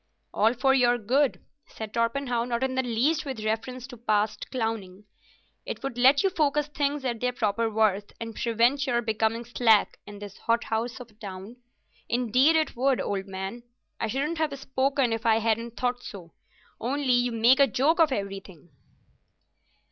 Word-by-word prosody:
"All 225 +4 +3
for 265 +2 +3
your 245 -2 +4
good," 255 +5 0 0.2
said 215 -1 -8
Torpenhow, 235 +1 0
not 240 +1 -2
in 265 0 0
the 260 - +1
least 255 +6 +1
with 265 -6 -5
reference 245 +3 -3
to 250 -2 -11
past 215 -1 -1
clowning. 220 -6 -4 0.6
"It - - -6
would 270 -3 -4
let 265 +6 +5
you 390 - +2
focus 295 -3 +1
things 285 -1 -1
at 240 -3 -2
their 250 +1 0
proper 225 -1 0
worth 210 -2 +1
and 225 -1 -6
prevent 240 +6 +1
your 240 -1 +1
becoming 220 +1 -1
slack 225 -3 +3
in 205 0 -9
this 200 -1 -10
hothouse 230 0 -1
of 240 -2 -11
a - - -25
town. 200 +2 -9 0.5
Indeed 250 +6 +3
it 315 -1 +1
would, 260 +1 +2
old 195 -1 -3
man. 190 +5 -6 0.4
I - - -1
shouldn't 290 +8 -2
have 300 -3 -1
spoken 265 -2 0
if 225 0 -3
I 225 -2 +4
hadn't 225 +1 -1
thought 245 0 -1
so. 175 -8 -10 0.5
Only, 260 +2 0
you 245 0 +2
make 235 +4 +4
a 280 - +6
joke 285 - +1
of 320 -3 +5
everything." 195 - -6
240 Hz, 170 wpm, -26 LUFS, 220-265 Hz, 0.6 s, a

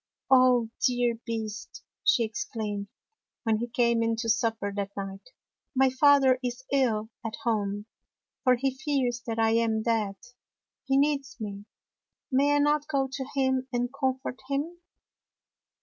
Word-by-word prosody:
" - - -30
Oh, 250 -3 +5 0.2
dear 245 -2 0
Beast!" 225 -1 -5 0.2
she 235 - +4
exclaimed, 220 - -4 0.6
when 225 -2 +2
he 240 - -2
came 235 -1 +2
in 230 0 +1
to 230 0 -3
supper 220 -2 0
that 200 0 -4
night, 195 - -6 0.2
" - - -58
my 265 0 +4
father 265 -1 +5
is 250 +1 -3
ill 225 -5 +1
at 225 -1 -4
home, 205 -3 -1 0.6
for 255 -3 +5
he 265 +1 -1
fears 265 -4 -1
that 225 -1 -2
I 225 0 +3
am 225 -1 +1
dead. 220 -4 0 0.7
He 270 0 +2
needs 280 -1 +1
me. 205 -2 -6 0.7
May 285 +2 +3
I - - +4
not 295 0 +2
go 275 -3 0
to 270 -2 -3
him 260 -1 +1
and 245 +1 -1
comfort 265 -2 -2
him? 300 +5 -2
245 Hz, 150 wpm, -28 LUFS, 225-270 Hz, 0.7 s, Oh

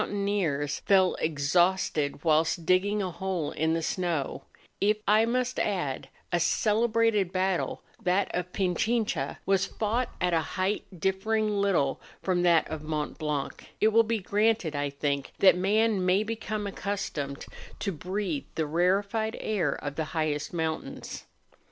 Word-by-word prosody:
301 200 -1 -2
taineers 145 -8 0
fell 190 -2 +4
exhausted 155 -1 +1
whilst 160 +1 +2
digging 200 +4 +2
a 185 - -3
hole 180 -3 -2
in 160 +1 0
the 165 - -2
snow; 170 -5 -2 0.3
if, 210 +1 +3
I 215 +2 +5
must 250 +1 0
add, 160 -9 -2 0.2
a 175 - +2
celebrated 215 +1 +2
battle, 185 -1 -1 0.2
that 185 +2 +1
of 180 0 -2
Pichincha, 215 +5 0
was 195 0 +2
fought 230 +4 -1
at 180 -1 +1
a 165 - +4
height 190 +5 -2
differing 215 +5 +1
little 200 -9 +1 0.2
from 180 -2 +1
that 170 -2 +4
of 155 -1 -5
Mont 155 -1 -3
Blanc, 150 -3 -3 0.2
it 215 - +5
will 225 +1 +5
be 230 0 0
granted, 205 -4 +1
I 145 0 -1
think, 140 0 -2
that 190 - +6
man 205 +2 +2
may 185 +3 +3
become 215 -1 -3
accustomed 190 -9 -4 0.3
to 200 - -2
breathe 195 - -3
the 160 - 0
rarefied 200 +7 +1
air 180 -10 0
of 145 -1 -6
the 160 - 0
highest 150 -2 -1
mountains. 160 -2 -4
185 Hz, 145 wpm, -28 LUFS, 160-210 Hz, 0.3 s, that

